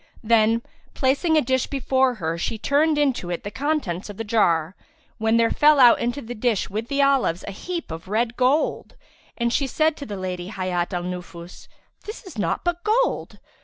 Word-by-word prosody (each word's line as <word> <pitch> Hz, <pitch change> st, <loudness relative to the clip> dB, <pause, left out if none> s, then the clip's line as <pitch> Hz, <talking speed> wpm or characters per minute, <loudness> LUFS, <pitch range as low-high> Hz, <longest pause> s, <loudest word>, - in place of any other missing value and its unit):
Then, 225 Hz, +1 st, +3 dB, 0.3 s
placing 285 Hz, +5 st, +2 dB
a 305 Hz, -, +3 dB
dish 260 Hz, 0 st, 0 dB
before 265 Hz, -1 st, +1 dB
her 165 Hz, -5 st, -3 dB
she 175 Hz, +6 st, -3 dB
turned 295 Hz, +6 st, +2 dB
into 270 Hz, -11 st, 0 dB
it 175 Hz, -, -4 dB
the 205 Hz, -, -5 dB
contents 265 Hz, -, -2 dB
of 205 Hz, -, -9 dB
the 225 Hz, -, -3 dB
jar, 185 Hz, -6 st, +1 dB, 0.4 s
when 220 Hz, +1 st, +2 dB
there 230 Hz, 0 st, +3 dB
fell 300 Hz, -1 st, +5 dB
out 245 Hz, -2 st, +7 dB
into 245 Hz, +4 st, -2 dB
the 235 Hz, +2 st, -6 dB
dish 225 Hz, -4 st, -1 dB
with 215 Hz, +3 st, -3 dB
the 280 Hz, +1 st, +1 dB
olives 270 Hz, -11 st, +2 dB
a -, -, -4 dB
heap 335 Hz, -, -6 dB
of 165 Hz, +3 st, -7 dB
red 225 Hz, +4 st, 0 dB
gold; 260 Hz, +5 st, 0 dB, 0.4 s
and 235 Hz, 0 st, 0 dB
she 275 Hz, -, +1 dB
said 310 Hz, +4 st, +1 dB
to 280 Hz, -, -8 dB
the 205 Hz, -, -5 dB
Lady 180 Hz, -1 st, -4 dB
Hayat 185 Hz, -3 st, -2 dB
al 175 Hz, -2 st, -2 dB
Nufus, 180 Hz, -1 st, -8 dB, 0.4 s
"This 425 Hz, +4 st, -8 dB
is 325 Hz, -, -9 dB
naught 205 Hz, -, -1 dB
but 350 Hz, 0 st, -2 dB
gold!" 455 Hz, +4 st, 0 dB
235 Hz, 195 wpm, -23 LUFS, 190-280 Hz, 0.4 s, out